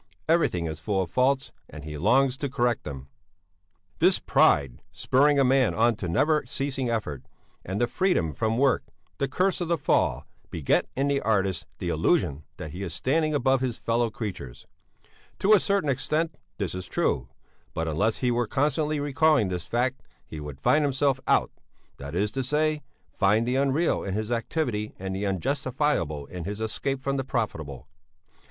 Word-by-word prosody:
Everything 160 - +2
is 80 -1 -4
full 95 +4 0
of 85 - -9
faults 130 +3 +1 0.2
and - - -10
he 75 0 -6
longs 130 - +3
to 140 +1 -3
correct 120 -2 0
them. 70 -2 -7 0.9
"'This 180 +3 +5
pride, 70 -4 +2
spurring 145 +3 +3
a 140 - +5
man 130 -2 +3
on 115 +1 +3
to 95 -4 -5
never 150 - +2
ceasing 135 -2 -2
effort, 105 - -2 0.4
and 95 +3 -3
the 120 - +3
freedom 125 - 0
from 110 +7 -1
work 135 0 +3 0.4
the 140 - +1
curse 185 +3 0
of 175 - -1
the 170 0 +1
fall - - +1 0.2
beget 75 -5 +1
in 135 +2 +1
the 140 -1 +1
artist 95 -4 0
the - - -3
illusion 70 +1 +1
that 75 - -7
he 90 - -7
is 85 -5 -3
standing 155 +3 +1
above 135 -1 +2
his 125 -3 -1
fellow 115 0 0
creatures; 90 - -7 0.7
to 205 +3 +4
a 210 - +7
certain 200 -5 0
extent 155 +4 0 0.2
this 95 -5 -2
is 95 0 -6
true, 60 -1 0 0.5
but 80 0 -1
unless 100 +8 +1
he 125 -1 +1
were 120 -1 0
constantly 150 +3 0
recalling 145 -5 +3
this 90 -2 -4
fact 125 +2 0 0.2
he 80 - -8
would 75 -2 -8
find 150 - +3
himself 135 -1 +1
out, - - +3 0.5
that 70 +3 -7
is 100 +3 0
to 135 - -2
say 150 +3 0 0.3
find 105 +3 +2
the 125 - +1
unreal 140 +5 +1
in 95 -1 -3
his 110 +2 -3
activity 115 -3 -2
and 95 0 -4
the 100 +1 -2
unjustifiable 95 - -1
in 90 +3 -7
his 105 +3 -5
escape 130 +5 -2
from 140 +1 -2
the 135 - -1
profitable. 80 - -4
120 Hz, 175 wpm, -26 LUFS, 95-140 Hz, 0.9 s, a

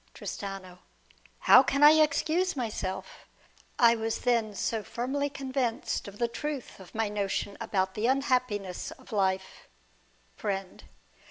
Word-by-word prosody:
Tristano. 195 -3 -7 0.6
How 255 - +8
can 275 +2 +1
I 295 - +11
excuse 315 +4 +2
myself? 210 -7 -4 0.5
I 235 -1 +6
was 225 0 -2
then 230 -4 +1
so 225 +2 -1
firmly 260 +6 -2
convinced 260 -6 -2
of 200 0 -10
the 235 - +1
truth 285 +1 -5
of 190 +1 -14
my 225 0 +1
notion 205 -1 -2
about 190 -1 0
the 215 +3 0
unhappiness 250 -8 0
of - - -14
life. 190 -2 -1 0.7
Friend. 195 -3 -4
225 Hz, 125 wpm, -29 LUFS, 200-265 Hz, 0.7 s, I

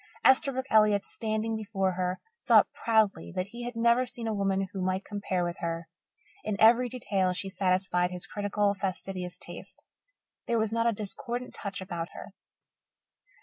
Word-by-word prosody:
Esterbrook 265 0 +4
Elliott, 210 -2 +5
standing 220 0 -2
before 200 -3 -1
her, 180 0 -2 0.3
thought - - +6
proudly 220 -6 +1
that 185 +1 -2
he 240 +2 -7
had 245 -1 -5
never 235 +2 +4
seen 240 -2 -5
a 220 - 0
woman 195 -1 0
who 190 - -3
might 185 +1 -1
compare 200 -3 -2
with 175 0 -3
her. 165 0 -3 0.5
In 215 -1 -2
every 240 +3 +6
detail 195 -7 0
she 195 +1 -3
satisfied 185 -1 +1
his 180 -1 -6
critical, 205 0 0
fastidious 185 -2 -4
taste. - - -9 0.6
There 235 -2 +2
was 220 -1 +1
not 230 +1 +1
a - - +4
discordant 240 +4 -4
touch 200 -2 -5
about 170 -2 -5
her. 205 - -9
200 Hz, 160 wpm, -29 LUFS, 185-225 Hz, 0.6 s, thought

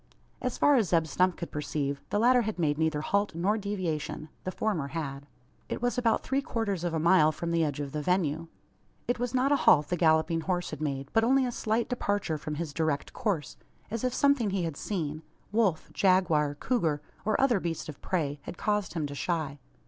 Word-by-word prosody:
As 250 -2 -2
far 290 -1 +5
as 215 -8 +2
Zeb 165 -1 +3
Stump 180 +4 +1
could 170 - -6
perceive, 145 -1 -2
the - - 0
latter 245 +3 +5
had 220 -3 -3
made 150 -3 +1
neither 160 -2 +1
halt 200 +2 0
nor 190 +6 +1
deviation. 180 -7 -3 0.2
The 185 - -1
former 185 -9 -1
had. 140 -2 -5 0.4
It - - -3
was 245 0 0
about 235 -3 +1
three 270 +1 0
quarters 205 -9 -2
of 170 -2 -1
a - - +1
mile 160 -1 +5
from 170 +2 -4
the 165 -1 +2
edge 145 -2 -2
of 140 -1 -4
the 150 - -3
venue. 165 -1 0 0.6
It 245 - 0
was 245 +1 -2
not 260 +2 +2
a - - +6
halt 150 - +5
the 180 - +1
galloping 160 0 +3
horse 180 +1 -2
had - - -6
made, 140 -2 -2
but 225 - +4
only 260 +3 +4
a 245 - -1
slight 225 0 0
departure 205 - -1
from 150 +1 -4
his 155 -2 -4
direct 155 -2 -1
course; 190 - -2 0.3
as 230 +1 -3
if 255 - +1
something 280 -4 +3
he 190 -2 -1
had 165 -3 -3
seen 155 -4 -3 0.3
wolf, 210 -7 +1
jaguar, 165 -6 +3
cougar, 160 - 0 0.2
or 215 0 +1
other 250 -6 +3
beast 170 -3 -3
of 150 -3 -9
prey 150 -6 -1
had 165 - -8
caused 210 -1 0
him 160 -3 -1
to 145 - -5
shy. 150 -2 -2
170 Hz, 210 wpm, -29 LUFS, 155-215 Hz, 0.6 s, a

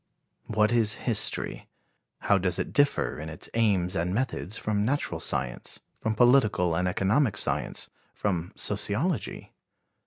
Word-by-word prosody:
What 105 0 +2
is 115 -2 +3
history? 110 -3 0 0.5
How 100 - +3
does 90 -1 0
it - - -3
differ 145 - +2
in 80 +1 -6
its 80 - -6
aims 100 -6 +2
and 90 +3 -1
methods 120 -4 -2
from 105 -1 -1
natural 140 +6 -1
science, - - -2 0.2
from 110 -1 -1
political 105 -8 +4
and 90 +2 0
economic 105 +5 +1
science, - - 0 0.2
from 90 -4 -2
sociology? - - -2
105 Hz, 130 wpm, -27 LUFS, 90-115 Hz, 0.5 s, political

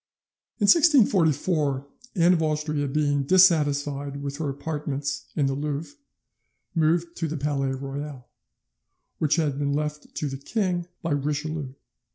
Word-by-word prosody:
"In 210 - -3
1644, 175 - +4 0.3
Anne 175 0 +5
of 165 - +1
Austria 150 -2 -1
being 145 0 +1
dissatisfied 145 -4 +3
with 140 0 -4
her 155 -2 -2
apartments 145 0 -4
in 145 - +2
the 135 - 0
Louvre, 145 - -3 0.8
moved 170 +1 +1
to 165 - -1
the 155 +1 -4
Palais 140 -2 -1
Royal, 135 -1 -6 0.9
which 155 -2 +2
had 150 -4 0
been 140 -1 0
left 150 0 -4
to 150 - -2
the 135 -1 -4
king 180 0 -1 0.2
by 165 - -2
Richelieu. 145 -1 -2
150 Hz, 135 wpm, -25 LUFS, 140-165 Hz, 0.9 s, Anne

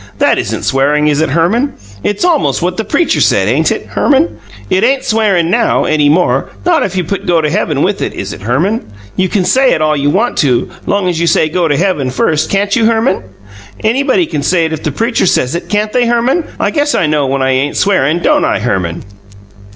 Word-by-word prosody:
That - - +2
isn't - - -3
swearing, 145 +3 +1
is 150 +1 +1
it, 160 - 0
Herman? 205 - +1 0.3
It's 205 - -1
almost 320 - +1
what 180 +1 -1
the 220 - -1
preacher 335 - 0
said, - - +2
ain't - - +1
it, - - -3
Herman? 290 +3 0 0.3
It 190 - +1
ain't 265 +2 +2
swearing 200 -6 +1
now, 235 +2 +1
any 150 -2 +2
more 175 +4 +1 0.2
not 345 -3 +3
if 195 - -2
you 180 - 0
put 200 +4 -5
'go 175 -2 +3
to 150 -2 -1
heaven' 160 -7 0
with 200 +1 -1
it, - - -2
is 100 +1 -5
it, - - -11
Herman? 160 - -1 0.3
You 185 0 0
can 195 -4 0
say 265 +4 +3
it - - 0
all 155 0 +1
you 145 0 0
want 220 +10 0
to, 125 -5 +1 0.2
long 200 -2 0
as 175 -2 -1
you 170 - 0
say 160 -1 +2
'go 175 +1 0
to 145 -2 0
heaven' 170 -8 0
first, 150 +4 0
CAN'T 200 0 0
you, 230 -3 +2
Herman? 225 -4 +1 0.6
Anybody 270 +9 +1
can 150 - -4
say 170 +2 +1
it 160 - -3
if 155 - -5
the 155 - -2
preacher 230 - 0
says 130 -6 +1
it, 170 - -5
can't 210 0 -1
they, 245 -1 +2
Herman? 240 +8 +1
I - - 0
guess 290 -1 0
I - - +1
know 150 -2 0
when 135 0 -1
I 130 - +1
ain't 135 +3 -1
swearing, 175 -4 +1
don't - - +2
I, - - +1
Herman?" 95 -7 -2
180 Hz, 230 wpm, -12 LUFS, 150-225 Hz, 0.6 s, not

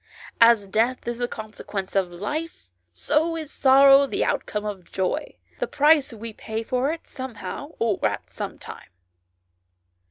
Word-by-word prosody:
"As 230 -3 +6
death 235 +5 0
is 240 0 -3
the 245 - 0
consequence 215 -4 -6
of 190 -3 +1
life, 210 - -5 0.2
so 310 - 0
is 310 -2 -6
sorrow 275 +1 +6
the - - -1
outcome 210 0 -2
of 195 -4 -6
joy, 190 -1 -2 0.2
the - - -1
price 295 - +4
we 225 0 -8
pay 220 +1 -5
for 255 +5 0
it 330 - -7
somehow 260 - -7
or 225 -3 0
at - - -5
sometime." - - -8
235 Hz, 140 wpm, -24 LUFS, 210-280 Hz, 0.2 s, As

